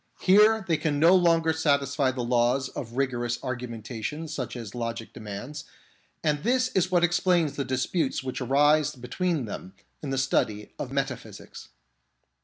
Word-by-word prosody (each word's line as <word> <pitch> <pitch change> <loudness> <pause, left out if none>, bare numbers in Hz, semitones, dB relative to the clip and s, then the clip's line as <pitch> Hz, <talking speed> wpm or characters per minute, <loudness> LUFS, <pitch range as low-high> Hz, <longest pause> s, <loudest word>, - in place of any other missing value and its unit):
Here 210 +2 +5
they 165 -3 +2
can 145 -2 -1
no 170 +4 +6
longer 165 -3 +3
satisfy 140 -3 +1
the 130 -1 -3
laws 125 +2 +1
of 115 -2 -7
rigorous 120 -2 -1
argu 125 -1 -4
mentation 115 +7 -5
such 145 -6 -5
as 115 -5 -7
logic 115 -1 -5
demands, 115 +7 -7 0.6
and 150 -2 +1
this 250 +5 +2
is 185 -5 +1
what 175 -2 +2
explains 175 -3 +2
the 140 - -1
disputes 130 +3 -1
which 130 -1 -4
arise 145 +2 +3
between 145 +4 -2
them 95 -2 -8 0.3
in 145 - -5
the 135 - -1
study 110 -5 0
of - - -4
metaphysics. - - -5
140 Hz, 155 wpm, -26 LUFS, 120-165 Hz, 0.6 s, no